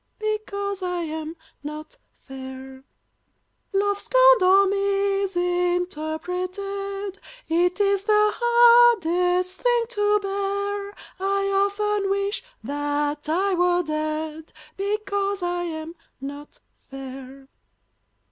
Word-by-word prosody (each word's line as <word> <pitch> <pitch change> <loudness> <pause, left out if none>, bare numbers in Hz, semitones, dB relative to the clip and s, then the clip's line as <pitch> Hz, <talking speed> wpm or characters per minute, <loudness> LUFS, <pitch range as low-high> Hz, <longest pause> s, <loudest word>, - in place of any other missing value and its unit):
Because 405 -2 -3
I 360 -1 -2
am 315 0 -5 0.3
not 305 +11 -8 0.2
fair; 265 0 -9 0.9
Love 405 0 +1
scorned - - +5
or 380 +2 +6
misinterpreted 385 0 -1 0.3
It 355 +3 +1
is 400 -1 +2
the 425 -1 +4
hardest 425 -7 +4
thing 485 -1 +2
to 415 -3 +2
bear; 400 +1 -2 0.2
I 395 +1 0 0.2
often 415 0 -1
wish 400 +3 -1 0.2
that 290 +1 -2
I 380 +5 +1
were 355 0 +2
dead, 310 0 -4 0.2
Because 400 -1 -2
I 350 0 -1
am 320 -1 -5 0.3
not 285 +2 -9 0.3
fair. 270 0 -9
380 Hz, 90 wpm, -24 LUFS, 315-400 Hz, 0.9 s, or